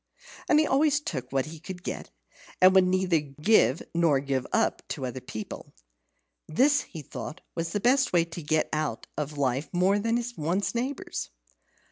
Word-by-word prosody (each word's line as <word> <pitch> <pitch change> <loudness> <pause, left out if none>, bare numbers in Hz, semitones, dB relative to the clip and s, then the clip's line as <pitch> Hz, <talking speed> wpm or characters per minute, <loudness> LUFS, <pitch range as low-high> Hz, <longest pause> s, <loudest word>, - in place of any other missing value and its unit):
He 310 0 +5
always 290 +1 +3
took 145 - -5
what 135 -1 +1
he 155 +1 -9
could 180 +1 -8
get, - - -5 0.5
and 185 0 +7
would 190 -1 +6
neither 185 -2 +2
give 150 - +2
nor 165 -5 +3
give 135 -2 -2
up - - +1
to 130 - -4
other 130 +1 -5
people. 110 -3 -8 0.7
This, 285 - +3
he 160 -5 -9
thought, 150 +4 -7
was 165 0 -3
the 245 +5 +3
way 170 -2 +3
to 170 +1 -8
get 155 +1 0
more 155 - +1
out 130 -7 -4
of 150 0 -4
life 135 +1 0
than 205 +6 +2
one's 175 +6 0
neighbours. 255 +3 -3
170 Hz, 160 wpm, -27 LUFS, 150-205 Hz, 0.7 s, and